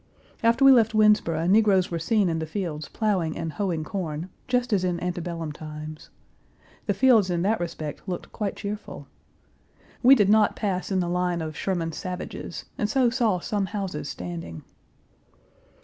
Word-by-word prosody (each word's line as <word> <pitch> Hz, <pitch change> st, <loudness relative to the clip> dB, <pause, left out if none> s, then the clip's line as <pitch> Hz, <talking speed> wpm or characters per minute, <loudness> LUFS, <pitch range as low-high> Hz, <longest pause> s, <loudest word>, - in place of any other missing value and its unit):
After 235 Hz, +4 st, +4 dB
we 270 Hz, -, +10 dB
left 225 Hz, -3 st, +4 dB
Winnsboro 210 Hz, -7 st, +3 dB
negroes 195 Hz, -2 st, +4 dB
were 170 Hz, -, -1 dB
seen 205 Hz, +3 st, +2 dB
in 165 Hz, -1 st, -1 dB
the 160 Hz, -, -4 dB
fields 160 Hz, -5 st, -4 dB
plowing 190 Hz, -8 st, 0 dB
and 160 Hz, -1 st, -4 dB
hoeing 180 Hz, -6 st, -1 dB
corn, 165 Hz, -1 st, -4 dB, 0.2 s
just 250 Hz, -2 st, +1 dB
as 190 Hz, -3 st, +2 dB
in 175 Hz, -2 st, 0 dB
antebellum 175 Hz, -3 st, -4 dB
times. 155 Hz, 0 st, -9 dB, 0.8 s
The -, -, +1 dB
fields 230 Hz, -8 st, +5 dB
in 175 Hz, -1 st, 0 dB
that 215 Hz, +3 st, +1 dB
respect 165 Hz, -3 st, -5 dB
looked 180 Hz, -, -5 dB
quite 210 Hz, -3 st, -3 dB
cheerful. 205 Hz, +1 st, -6 dB, 1.0 s
We 265 Hz, +2 st, +8 dB
did 205 Hz, -6 st, +3 dB
not 215 Hz, +1 st, +4 dB
pass 195 Hz, -2 st, -2 dB
in 190 Hz, -1 st, +2 dB
the 175 Hz, -, -1 dB
line 180 Hz, 0 st, 0 dB
of 155 Hz, -2 st, -5 dB
Sherman's 165 Hz, -4 st, -2 dB
savages, 180 Hz, -1 st, -6 dB
and 210 Hz, -, 0 dB
so 250 Hz, 0 st, +3 dB
saw 230 Hz, -6 st, +2 dB
some 200 Hz, +1 st, -2 dB
houses 185 Hz, -8 st, -4 dB
standing. 85 Hz, -2 st, -7 dB
180 Hz, 165 wpm, -25 LUFS, 165-210 Hz, 1.0 s, we